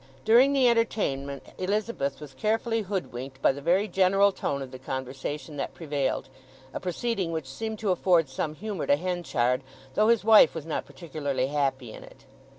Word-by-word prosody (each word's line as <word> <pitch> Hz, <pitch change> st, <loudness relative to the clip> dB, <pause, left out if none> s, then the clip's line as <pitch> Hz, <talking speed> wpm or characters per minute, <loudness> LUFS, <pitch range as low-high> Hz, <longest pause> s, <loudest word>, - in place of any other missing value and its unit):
During 245 Hz, +5 st, +6 dB
the 265 Hz, -3 st, +4 dB
entertainment 140 Hz, -, 0 dB
Elizabeth 185 Hz, -8 st, -1 dB
was 150 Hz, -3 st, -10 dB
carefully 225 Hz, -, 0 dB
hoodwinked 135 Hz, -, -5 dB
by -, -, +4 dB
the 140 Hz, +1 st, -7 dB
very 185 Hz, +7 st, +2 dB
general 195 Hz, +1 st, +4 dB
tone 140 Hz, -7 st, -3 dB
of 130 Hz, -, -10 dB
the 130 Hz, -, -9 dB
conversation 135 Hz, +4 st, -5 dB
that 140 Hz, -, -4 dB
prevailed—a 135 Hz, -3 st, -4 dB
proceeding 185 Hz, 0 st, -2 dB
which 160 Hz, -3 st, -3 dB
seemed 220 Hz, +11 st, -5 dB
to 210 Hz, -2 st, 0 dB
afford 175 Hz, -3 st, +3 dB
some 150 Hz, +4 st, -3 dB
humour 205 Hz, -2 st, -4 dB
to 140 Hz, -, +5 dB
Henchard, 150 Hz, -7 st, 0 dB, 0.3 s
though 215 Hz, +7 st, +3 dB
his 230 Hz, -2 st, +4 dB
wife 220 Hz, -4 st, +7 dB
was 160 Hz, -2 st, -5 dB
not 160 Hz, -, -3 dB
particularly 145 Hz, -6 st, -3 dB
happy 135 Hz, -5 st, -1 dB
in -, -, -10 dB
it. -, -, -16 dB
160 Hz, 165 wpm, -27 LUFS, 135-205 Hz, 0.3 s, wife